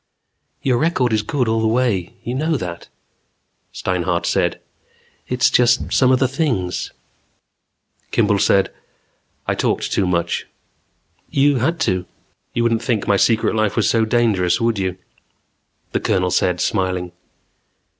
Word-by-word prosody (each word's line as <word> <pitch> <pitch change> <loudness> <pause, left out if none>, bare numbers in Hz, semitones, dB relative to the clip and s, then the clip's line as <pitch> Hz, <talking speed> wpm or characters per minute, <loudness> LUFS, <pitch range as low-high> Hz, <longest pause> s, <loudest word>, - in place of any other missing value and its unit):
"Your 125 -3 +2
record 130 -8 +1
is 110 - +2
good 125 +3 -1
all 110 0 +1
the 110 - +2
way. 110 -6 0
You 120 - -4
know 155 +4 0
that," 85 -5 -6 0.8
Steinhart 90 -1 -1
said. - - 0 0.7
"It's 125 0 +2
just 125 +1 +3
some 130 -1 +4
of 130 - +5
the 130 0 +2
things 125 - -2 0.6
" - - -46
Kimball 105 -3 +2
said: 95 0 +2 0.7
"I - - 0
talked - - -1
too 95 - +1
much." 85 -2 -1 0.8
"You 140 0 +3
had 160 +8 0
to." 95 -4 0 0.5
"You 120 - +1
wouldn't 115 -1 +1
think 115 -5 -1
my 100 - +4
secret 110 +4 +2
life 110 -2 0
was 110 -4 +2
so 115 -1 +2
dangerous, 110 -5 +2
would 115 -3 0
you," 95 -1 -2 0.9
the - - 0
Colonel 90 -1 0
said 90 0 +1
smiling. 95 -3 -1
110 Hz, 145 wpm, -20 LUFS, 95-125 Hz, 0.9 s, of